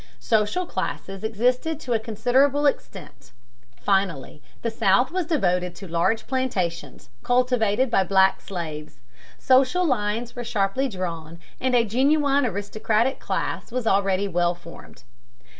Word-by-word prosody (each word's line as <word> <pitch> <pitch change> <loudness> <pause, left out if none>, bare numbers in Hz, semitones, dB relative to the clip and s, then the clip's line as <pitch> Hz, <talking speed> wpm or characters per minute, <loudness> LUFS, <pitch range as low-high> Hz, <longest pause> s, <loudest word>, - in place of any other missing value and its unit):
Social 220 - 0
classes 195 - -5
existed 250 +8 0
to 245 - -2
a 225 - +2
considerable 255 +6 +1
extent. 285 - -3 0.5
Finally, 170 -2 -1 0.2
the 230 - -1
South 225 +4 +2
was 365 -2 -2
devoted 180 - 0
to 195 +2 -9
large 170 +7 0
plantations, 180 - -3
cultivated 245 -1 +1
by 195 - +3
black 190 +1 +3
slaves. 155 - -7 0.4
Social 265 +8 +3
lines 230 -3 -1
were 245 - -5
sharply 230 +4 0
drawn, 170 -5 -5 0.2
and 255 -1 +1
a 235 -1 +4
genuine 280 +4 +2
aristocratic 215 +4 -1
class - - -3
was 250 -1 -3
already 195 -1 +2
well 175 -1 +1
formed. 170 -6 -14
220 Hz, 125 wpm, -24 LUFS, 190-255 Hz, 0.5 s, a